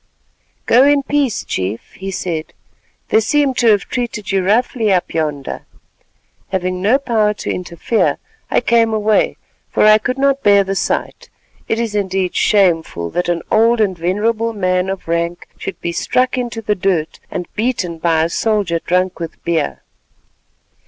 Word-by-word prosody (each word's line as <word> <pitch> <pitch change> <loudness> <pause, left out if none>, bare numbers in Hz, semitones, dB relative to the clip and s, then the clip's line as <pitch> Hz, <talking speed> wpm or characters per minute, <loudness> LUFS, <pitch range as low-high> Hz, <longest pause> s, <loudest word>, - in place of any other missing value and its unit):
"Go 245 +3 +5
in 285 0 +4
peace, 280 -4 0
Chief," 95 +4 -4
he 195 0 -6
said; 175 -4 -4 0.6
"they - - +4
seem 280 +4 +2
to 240 -1 +1
have 205 -3 +4
treated 235 -5 -3
you 195 -1 +1
roughly 220 +2 +1
up 180 -2 0
yonder. 150 -4 -3 0.9
Having 185 -1 -2
no 220 +7 +4
power 220 -6 +1
to - - -4
interfere, 180 +5 -1 0.3
I - - +2
came 230 -2 +2
away 215 0 +1 0.3
for - - +2
I 215 0 +7
could 250 +4 -2
not 275 0 +2
bear 200 -1 +5
the 195 0 -3
sight. 195 - -2 0.4
It 225 - 0
is 230 -2 -2
indeed 190 -3 -1
shameful 165 - +2
that 175 0 -1
an 170 -1 -1
old 230 +2 +4
and 200 -4 +2
venerable 215 +7 0
man 185 -2 0
of 195 -3 -5
rank 170 +1 -2
should - - -6
be 170 - -2
struck 255 +9 0
into 240 -3 -4
the 210 - +1
dirt, 180 -5 -1
and 180 - -4
beaten 210 -7 -2
by 160 -1 +2
a 165 - 0
soldier 200 -4 0
drunk 180 +2 0
with 165 -1 -7
beer." 170 -1 -1
200 Hz, 160 wpm, -17 LUFS, 175-230 Hz, 0.9 s, I